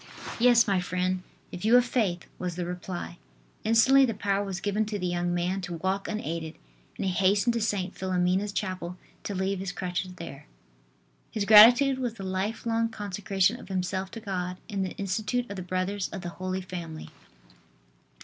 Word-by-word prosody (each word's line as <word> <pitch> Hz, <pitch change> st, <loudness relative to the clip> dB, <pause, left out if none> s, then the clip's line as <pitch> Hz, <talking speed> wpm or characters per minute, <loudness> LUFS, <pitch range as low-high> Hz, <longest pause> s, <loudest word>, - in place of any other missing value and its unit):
"Yes, 240 Hz, 0 st, +6 dB
my 195 Hz, -2 st, +2 dB
friend, 185 Hz, +1 st, -1 dB, 0.3 s
if 180 Hz, -, -7 dB
you 225 Hz, +3 st, +5 dB
have 245 Hz, 0 st, +6 dB
faith," 205 Hz, -9 st, 0 dB
was 180 Hz, -2 st, -3 dB
the 180 Hz, 0 st, -3 dB
reply. 175 Hz, -, -6 dB, 0.4 s
Instantly 245 Hz, +5 st, +6 dB
the 230 Hz, -5 st, +1 dB
power 200 Hz, 0 st, 0 dB
was 195 Hz, -2 st, -4 dB
given 205 Hz, +3 st, 0 dB
to 210 Hz, -1 st, -2 dB
the 180 Hz, -, -3 dB
young 175 Hz, 0 st, 0 dB
man 175 Hz, +2 st, -1 dB
to 175 Hz, -1 st, -5 dB
walk 190 Hz, +4 st, -1 dB
unaided, 165 Hz, -7 st, -4 dB, 0.4 s
and -, -, -2 dB
he 190 Hz, -, +1 dB
hastened 200 Hz, +5 st, +3 dB
to 230 Hz, -, -1 dB
St. 200 Hz, -4 st, -1 dB
Philomena's 185 Hz, +2 st, 0 dB
chapel 185 Hz, -3 st, -4 dB, 0.2 s
to 205 Hz, -, -4 dB
leave 190 Hz, +1 st, -1 dB
his 190 Hz, -1 st, -3 dB
crutches 180 Hz, 0 st, -3 dB
there. 150 Hz, -4 st, -9 dB, 0.8 s
His 210 Hz, -2 st, -2 dB
gratitude 245 Hz, +6 st, +8 dB
was 245 Hz, -3 st, -2 dB
the 195 Hz, -, -8 dB
life 190 Hz, +5 st, -2 dB
long 230 Hz, 0 st, +1 dB
consecration 200 Hz, 0 st, 0 dB
of -, -, -12 dB
himself 190 Hz, 0 st, -2 dB
to 225 Hz, -, -8 dB
God 180 Hz, -4 st, -3 dB
in 205 Hz, -3 st, -3 dB
the 190 Hz, -, -2 dB
institute 215 Hz, +5 st, -1 dB
of -, -, -4 dB
the 190 Hz, -, -5 dB
Brothers 185 Hz, +2 st, -2 dB
of 195 Hz, -, -6 dB
the 175 Hz, -, -3 dB
Holy 185 Hz, +2 st, -4 dB
Family. 170 Hz, -4 st, -7 dB
190 Hz, 180 wpm, -28 LUFS, 180-210 Hz, 0.8 s, gratitude